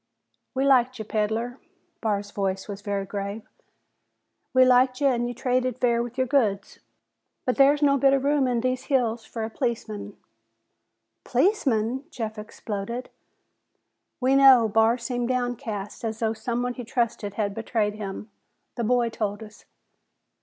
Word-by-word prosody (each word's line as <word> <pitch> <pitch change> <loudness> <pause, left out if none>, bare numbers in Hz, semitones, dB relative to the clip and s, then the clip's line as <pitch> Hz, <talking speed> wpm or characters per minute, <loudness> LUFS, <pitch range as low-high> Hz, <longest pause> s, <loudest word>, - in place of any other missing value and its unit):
"We 265 +1 +1
liked 255 -2 +4
ya, 220 - -6
peddler." 220 +4 -1 0.4
Barr's 205 -2 -1
voice 195 -1 -2
was 200 -1 -7
very 200 -1 -2
grave. 200 +2 -5 1.0
"We 255 0 +6
liked 255 0 +4
ya 280 -1 +4
an' 240 -2 0
you 245 - -5
traded 255 -1 0
fair 235 -2 +2
with 240 +1 -6
your 260 - +2
goods. 215 -7 0 0.7
But 250 - 0
there's 285 +2 +5
no 280 -1 +4
bit 270 +1 +5
of 270 -1 +1
room 285 -1 +2
in 240 -2 0
these 255 0 -1
hills 235 -4 0
for 225 - -5
a 220 - -3
policeman." 220 -5 -4 1.1
"Policeman!" 260 - +1
Jeff 220 -7 -5
exploded. 215 +2 -6 1.1
"We 260 +1 +3
know," 265 -4 +7
Barr 225 +2 +3
seemed 245 0 -3
downcast, 240 -5 -3
as 220 -1 -3
though 225 -1 0
someone 245 +2 -2
he 245 - -7
trusted 225 -4 -2
had 205 -2 -1
betrayed 220 -1 -1
him. 210 0 -7 0.5
"The 235 - -1
boy 240 +1 +2
told 215 -1 -3
us." 215 -1 -14
235 Hz, 150 wpm, -25 LUFS, 215-255 Hz, 1.1 s, know